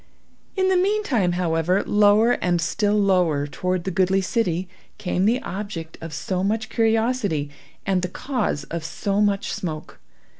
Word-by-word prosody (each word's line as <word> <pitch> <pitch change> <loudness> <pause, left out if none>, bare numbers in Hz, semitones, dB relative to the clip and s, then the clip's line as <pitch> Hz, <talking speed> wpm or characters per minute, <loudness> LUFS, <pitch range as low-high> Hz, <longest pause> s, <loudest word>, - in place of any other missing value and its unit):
In 375 -1 +2
the 380 - +3
meantime, 360 - +1
however, 175 +1 +1
lower 210 +3 +4
and 175 -7 +1
still 205 +5 0
lower 180 -8 +2
toward 180 +4 -2
the 190 - -3
goodly 190 +2 +2
city, 185 -3 -1 0.3
came 180 0 -1
the 235 +4 +3
object 185 -5 -6
of 165 0 -6
so 185 +4 -2
much 220 +2 -1
curiosity, 220 - +1 0.3
and 190 -2 +1
the 180 - -1
cause 245 - -2
of 170 -1 -5
so 200 +5 -1
much 200 -1 +1
smoke. 155 -4 -6
190 Hz, 150 wpm, -23 LUFS, 175-220 Hz, 0.3 s, lower